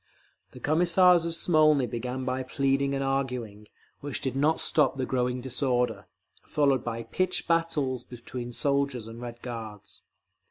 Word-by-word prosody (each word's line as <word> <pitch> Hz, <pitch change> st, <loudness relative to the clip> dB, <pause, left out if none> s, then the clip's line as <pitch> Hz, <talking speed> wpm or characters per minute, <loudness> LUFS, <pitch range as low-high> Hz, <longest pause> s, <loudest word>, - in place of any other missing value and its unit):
The -, -, -10 dB
Commissars 175 Hz, +2 st, +4 dB
of 165 Hz, -, -2 dB
Smolny 155 Hz, -5 st, +4 dB
began 125 Hz, +2 st, -4 dB
by 130 Hz, 0 st, -1 dB
pleading 135 Hz, +1 st, 0 dB
and 135 Hz, -, -1 dB
arguing, 125 Hz, -6 st, -3 dB, 0.3 s
which 145 Hz, -2 st, -4 dB
did 130 Hz, -1 st, -3 dB
not 150 Hz, +4 st, +2 dB
stop 145 Hz, -3 st, +2 dB
the 130 Hz, -, -1 dB
growing 125 Hz, -1 st, -1 dB
disorder, 125 Hz, -4 st, 0 dB, 0.3 s
followed 140 Hz, -4 st, +1 dB
by 115 Hz, -1 st, -4 dB
pitched 185 Hz, +8 st, -1 dB
battles 150 Hz, -7 st, 0 dB
between 120 Hz, 0 st, -7 dB
soldiers 140 Hz, -2 st, 0 dB
and 115 Hz, +1 st, -9 dB
Red 120 Hz, -1 st, -8 dB
Guards…. 110 Hz, -4 st, -8 dB
130 Hz, 145 wpm, -27 LUFS, 120-145 Hz, 0.3 s, Commissars